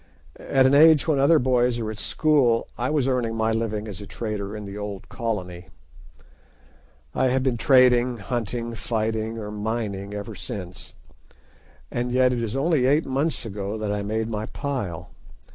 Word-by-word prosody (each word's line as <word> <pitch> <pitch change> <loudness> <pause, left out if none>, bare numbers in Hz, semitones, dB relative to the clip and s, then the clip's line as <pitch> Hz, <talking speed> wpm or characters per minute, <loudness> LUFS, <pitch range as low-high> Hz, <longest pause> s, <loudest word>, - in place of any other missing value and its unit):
At 130 -1 +2
an 130 - +4
age 155 +1 +6
when 150 -4 +2
other 145 +4 +5
boys 125 -2 +2
are 110 -2 -3
at 110 - -8
school 135 -7 +2
I 125 +2 -2
was 145 -4 +1
earning 125 -4 0
my 110 0 +1
living 110 -1 -2
as 100 -2 -7
a 100 - -9
trader 105 -2 -4
in 105 - -7
the 100 0 -8
old 105 -2 -6
Colony. 95 -6 -4 1.5
I 130 - +2
have 130 +1 +1
been 130 -2 +1
trading, 125 -1 +4
hunting, 115 +1 -3
fighting, 110 0 -2
or 105 -2 -6
mining 105 -2 -3
ever 105 +2 -6
since. 95 -3 -7 1.0
And 120 +1 -2
yet 125 0 +3
it 120 - -1
is 115 +1 -3
only 140 -2 +2
eight 145 +4 +3
months 140 +2 -1
ago 100 0 -4
that 105 -1 -2
I 105 0 -1
made 110 +2 -2
my 110 -1 -3
pile. 120 - -4
115 Hz, 170 wpm, -24 LUFS, 105-130 Hz, 1.5 s, age